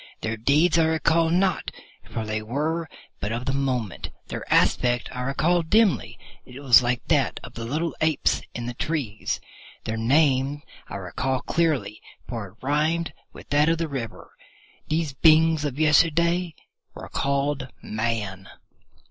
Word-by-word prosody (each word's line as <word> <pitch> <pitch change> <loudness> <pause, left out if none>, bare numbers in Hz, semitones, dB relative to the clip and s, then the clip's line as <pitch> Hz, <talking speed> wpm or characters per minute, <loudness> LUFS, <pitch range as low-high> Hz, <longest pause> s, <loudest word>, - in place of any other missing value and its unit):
Their 110 +1 -2
deeds 150 +9 +3
I 165 - +4
recall 160 +1 +2
not, 185 +2 +1 0.4
for 110 - -3
they 110 0 -2
were 155 +8 -2 0.3
but 100 - -3
of 120 +2 -3
the 135 - 0
moment. 130 -8 -2 0.2
Their - - -6
aspect 120 0 +3
I 125 - -3
recall 150 +7 +1
dimly, 180 - +2 0.3
for - - -21
it 125 +2 -10
was 130 -3 +7
like 120 0 -1
to - - -32
that - - +2
of - - -10
the 115 - -6
little 155 +7 -2
apes 155 -1 +2
in 120 - -4
the 120 - -4
trees. 125 -7 -3 0.4
Their 110 - -3
name 135 +3 +2 0.3
I - - -6
recall 125 +8 -2
clearly, 140 -12 0 0.3
for 115 -5 -5
it 95 - -18
rhymed 155 +4 0 0.2
with - - -13
that 150 +2 +4
of 165 - +2
the 165 0 -2
river. 125 -7 -6 0.6
These 155 -2 -1
beings 160 +1 +4
of 140 -2 -3
yesterday 165 +3 +3 0.4
were - - -8
called 140 0 -1 0.2
Man." 105 -4 -3
140 Hz, 155 wpm, -24 LUFS, 120-160 Hz, 0.6 s, was